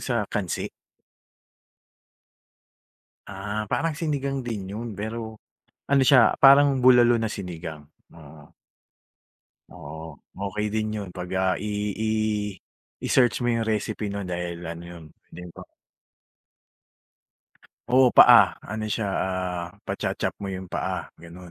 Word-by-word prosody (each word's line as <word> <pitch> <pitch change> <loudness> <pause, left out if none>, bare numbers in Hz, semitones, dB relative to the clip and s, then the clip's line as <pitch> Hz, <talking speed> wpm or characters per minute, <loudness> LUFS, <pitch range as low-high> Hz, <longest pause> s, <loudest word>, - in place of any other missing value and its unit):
sa 120 -5 -1
kansi? 100 -5 -2 2.6
Ah, 105 +2 -5
parang 165 -2 0
sinigang 140 -4 -2
din 110 -6 -5
yun 110 -2 -6
pero 110 0 -5 0.5
ano 140 -1 +4
siya 130 -5 +5
parang 140 0 +6
bulalo 120 -2 +5
na 110 - -1
sinigang, 85 -7 -6 0.3
oo. 75 -1 -15 1.2
Oo, 80 -1 -10 0.3
okey 105 +2 -3
din 110 0 0
yun 100 -3 -6
pagka 95 +1 -1
i-i 105 -1 -2 0.5
i-search 120 -5 +3
mo - - +1
yung 115 -1 -1
recipe 105 0 -2
no'n 100 -1 -4
dahil 90 -1 -4
ano 85 +1 -6
yun, 85 -2 -11 0.3
hindi 90 - -10
pa - - -10 2.3
Oo, 125 0 +5
paa. - - +8 0.2
Ano 110 0 -3
siya, 110 +1 -2
ah, 90 -2 -2 0.2
pacho-chop - - -3
mo 100 - -6
yung 95 -1 -6
paa, - - -3
ganun. 85 +2 -12
105 Hz, 115 wpm, -25 LUFS, 90-115 Hz, 2.6 s, paa